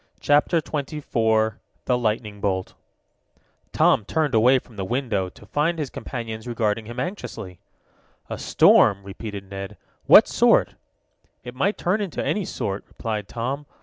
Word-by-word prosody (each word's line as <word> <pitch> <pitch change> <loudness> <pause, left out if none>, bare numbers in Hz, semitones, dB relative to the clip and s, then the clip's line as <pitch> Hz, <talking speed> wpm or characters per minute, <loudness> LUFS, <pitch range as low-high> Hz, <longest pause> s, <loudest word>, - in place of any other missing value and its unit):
CHAPTER 150 +3 +3
XXIV 115 -8 0 0.3
THE 125 - +2
LIGHTNING 105 -3 -2
BOLT 95 -2 -1 1.0
Tom 110 - +3
turned 150 +5 -1
away 120 +4 +5
from 125 -2 -10
the 100 - -4
window, 110 -4 -1
to - - -17
find 160 +4 0
his 150 -5 -4
companions 115 -2 -6
regarding 110 -2 -1
him 120 +2 -7
anxiously. 125 - -6 0.7
"A - - -6
storm," 100 0 +4
repeated 100 0 -7
Ned. 95 0 -7 0.3
"What - - +9
sort?" - - +3 0.7
"It 125 0 -8
might 190 +11 0
turn 190 +5 0
into 195 -5 -3
any 205 -3 0
sort," 100 -8 -4
replied 105 -3 -4
Tom. 135 +5 -4
115 Hz, 140 wpm, -23 LUFS, 105-140 Hz, 1.0 s, What